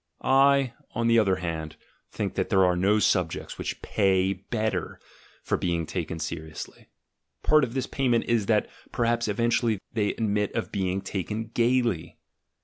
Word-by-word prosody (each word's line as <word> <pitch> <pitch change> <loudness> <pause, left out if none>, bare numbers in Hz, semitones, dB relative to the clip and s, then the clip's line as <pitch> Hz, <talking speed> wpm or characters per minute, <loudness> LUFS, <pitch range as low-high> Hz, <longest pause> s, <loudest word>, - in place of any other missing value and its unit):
I, 135 -1 +4 0.2
on 115 +1 0
the 115 0 +5
other 100 -4 +3
hand, 80 -3 -4 0.3
think - - -3
that - - -1
there 95 -1 +4
are 90 -1 +3
no 100 +4 +3
subjects 90 -5 0
which - - -4
pay 95 -2 +2
better 100 -1 -3 0.4
for - - 0
being 85 -2 -1
taken 80 -1 -4
seriously; 80 0 -7 0.6
part 155 -1 +5
of 120 -1 -2
this 130 -1 0
payment 125 -4 +1
is, 115 -4 +1
that 105 -2 +2 0.2
perhaps 120 0 +1
eventually 115 +1 +1 0.2
they 105 -2 0
admit 105 -2 -1
of 115 - -2
being 95 -1 -1
taken 105 +4 -4
gaily. 120 -7 +1
105 Hz, 150 wpm, -26 LUFS, 90-115 Hz, 0.6 s, the